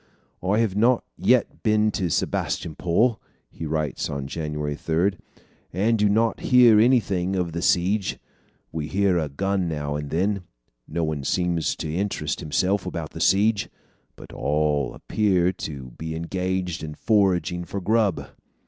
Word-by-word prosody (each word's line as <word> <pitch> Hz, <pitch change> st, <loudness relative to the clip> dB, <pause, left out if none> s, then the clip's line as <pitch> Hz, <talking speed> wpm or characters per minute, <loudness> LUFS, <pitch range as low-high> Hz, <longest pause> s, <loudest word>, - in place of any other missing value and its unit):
"I 95 Hz, +3 st, +1 dB
have 110 Hz, -4 st, +1 dB
not 115 Hz, +3 st, +3 dB
yet -, -, +3 dB, 0.2 s
seen 110 Hz, 0 st, +3 dB
Sebastopol," 90 Hz, +4 st, 0 dB, 0.3 s
he 80 Hz, -, -6 dB
writes 75 Hz, -1 st, -2 dB
on 70 Hz, -1 st, -4 dB
January 75 Hz, -1 st, -3 dB
3, 85 Hz, +6 st, +1 dB, 0.6 s
"and 110 Hz, +5 st, +1 dB
do 105 Hz, 0 st, +4 dB
not 110 Hz, +2 st, +2 dB
hear 120 Hz, -4 st, +6 dB
anything 100 Hz, -6 st, +2 dB
of 90 Hz, -2 st, -1 dB
the 85 Hz, +1 st, -4 dB
siege. 95 Hz, +4 st, +1 dB, 0.5 s
We 80 Hz, -2 st, -4 dB
hear 95 Hz, 0 st, +2 dB
a 75 Hz, -2 st, -2 dB
gun 95 Hz, +5 st, -1 dB
now 75 Hz, -2 st, -3 dB
and 75 Hz, -1 st, -4 dB
then. 95 Hz, +5 st, 0 dB, 0.5 s
No 85 Hz, +2 st, -2 dB
one 75 Hz, -3 st, -2 dB
seems 85 Hz, +1 st, 0 dB
to 80 Hz, -1 st, -4 dB
interest 85 Hz, -5 st, -2 dB
himself 95 Hz, +5 st, 0 dB
about 85 Hz, -4 st, -5 dB
the -, -, -7 dB
siege, 100 Hz, +2 st, +3 dB, 0.5 s
but -, -, -13 dB
all 75 Hz, -1 st, 0 dB
appear 95 Hz, -4 st, +1 dB
to 70 Hz, -7 st, -7 dB
be 80 Hz, 0 st, -4 dB
engaged 90 Hz, +1 st, -2 dB
in 75 Hz, -1 st, -6 dB
foraging 90 Hz, -5 st, +1 dB
for 100 Hz, +3 st, -5 dB
grub." 105 Hz, -2 st, +1 dB
90 Hz, 145 wpm, -24 LUFS, 80-100 Hz, 0.6 s, hear